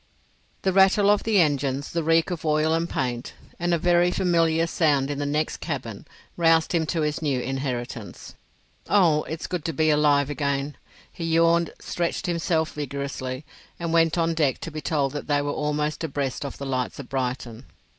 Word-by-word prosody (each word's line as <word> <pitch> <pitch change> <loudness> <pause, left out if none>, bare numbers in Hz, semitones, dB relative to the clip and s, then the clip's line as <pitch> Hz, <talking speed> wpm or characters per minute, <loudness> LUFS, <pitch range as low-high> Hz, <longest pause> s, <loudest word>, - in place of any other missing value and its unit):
The 190 - +1
rattle 195 +2 +5
of 205 - +3
the 220 -3 +2
engines, 140 -3 +1
the 170 - -1
reek 165 +2 +2
of 175 - -4
oil 155 0 +2
and 165 +1 0
paint, 125 -1 -3 0.2
and 175 0 0
a 170 - +3
very 175 +1 +3
familiar 165 -3 +2
sound 145 -5 +1
in 145 - -4
the 145 - -1
next 150 +2 -1
cabin 125 -10 -5 0.3
roused 165 -1 +3
him 165 -3 +1
to 165 0 -1
his 150 +1 -1
new 140 -5 0
inheritance. 125 -4 -5 0.6
"Oh, 170 -7 +4
it's 160 0 -5
good 180 -4 -3
to 165 - -1
be 155 +2 +2
alive 145 -1 +3
again!" 140 -1 -2 0.4
He 165 - -5
yawned, 165 +1 +3
stretched 175 +2 -2
himself 165 -2 0
vigorously, 140 -2 -4 0.3
and 170 -1 -2
went 165 0 +3
on 165 0 +1
deck 150 -5 +1
to 165 - -5
be 155 0 -5
told 140 -2 0
that 145 +1 -6
they 145 -1 +2
were 145 - -1
almost 150 +1 -2
abreast 140 -2 -2
of 140 - -6
the 140 - -6
lights 130 -2 -2
of 140 - -8
Brighton. 125 -2 -4
155 Hz, 185 wpm, -25 LUFS, 140-165 Hz, 0.6 s, rattle